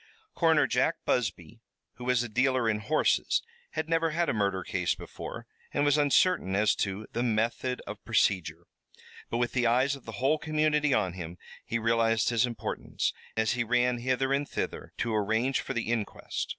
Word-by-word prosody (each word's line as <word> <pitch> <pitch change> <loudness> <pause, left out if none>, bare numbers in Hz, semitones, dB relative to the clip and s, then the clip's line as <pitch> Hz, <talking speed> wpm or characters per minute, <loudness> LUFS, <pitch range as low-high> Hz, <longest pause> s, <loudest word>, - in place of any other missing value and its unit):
Coroner 160 -4 +4
Jack 130 +6 +1
Busby, 105 -2 -1 0.4
who 125 - -8
was 125 -1 +2
a - - -4
dealer 125 +1 +1
in 105 -1 +1
horses, 155 +8 +1 0.3
had 160 - -2
never 165 0 +2
had 170 +2 0
a - - +1
murder 100 -3 0
case - - -1
before, - - -8 0.3
and 145 - +2
was 145 -1 +4
uncertain 145 - +3
as 105 +1 +3
to 100 +2 -2
the 120 - -1
method 120 +2 0
of 105 0 -8
procedure. 90 -7 +1 0.6
But 115 - -1
with 120 0 0
the 125 -2 +1
eyes 130 +4 +3
of 135 - -14
the - - -7
whole 140 +5 +1
community 155 -1 +1
on 95 -8 +1
him 85 -1 -7 0.3
he 115 - -2
realized 115 -1 +2
his 120 0 +2
importance, 120 - -3 0.2
as 110 0 +2
he 120 - 0
ran 125 +1 +2
hither 130 +2 0
and 140 +1 -1
thither, - - -4
to 115 - -1
arrange 110 +5 +1
for 135 - -5
the 120 - 0
inquest. 115 -4 -3
120 Hz, 180 wpm, -29 LUFS, 110-135 Hz, 0.6 s, Coroner